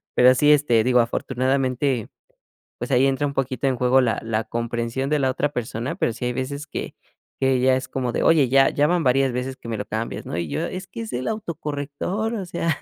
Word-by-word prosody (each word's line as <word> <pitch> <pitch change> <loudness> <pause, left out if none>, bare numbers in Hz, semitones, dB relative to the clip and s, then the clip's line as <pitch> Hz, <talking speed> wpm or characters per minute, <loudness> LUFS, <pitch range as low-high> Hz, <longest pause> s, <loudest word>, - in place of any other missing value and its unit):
pero 125 +1 +6
sí, 145 +3 +4
este, 125 -7 +3
digo 125 +1 +3
afortunadamente, 130 0 0 0.7
pues - - -4
ahí 130 +1 +4
entra 135 +2 0
un 140 - -5
poquito 135 0 -1
en 130 - +1
juego 125 +2 +4
la 115 -4 0
la 110 -1 -1
comprensión 120 +3 -2
de 150 0 +2
la 135 -1 +2
otra 145 +3 -1
persona, 120 +1 -3
pero 115 - 0
sí 125 - -5
hay 125 - -1
veces 140 +3 -4
que - - -6 0.4
que 135 -1 +2
ya 130 0 +4
es 130 0 -5
como 130 -2 -2
de - - 0
oye, 150 -6 +4
ya 135 +1 +5
ya 145 +1 +2
van 175 0 +1
varias 135 0 +3
veces 130 +2 -3
que - - -12
me 115 - -2
lo 105 - -4
cambias, 110 +2 -4
¿no? 80 - -4
Y 85 -1 -2
yo: 70 - -2
“Es 185 0 -6
que 230 - -7
es 225 - -6
el 125 +1 -3
autocorrector. 170 +1 -3
O 200 -4 -4
sea”. 165 -3 -1
130 Hz, 230 wpm, -23 LUFS, 125-145 Hz, 0.7 s, pero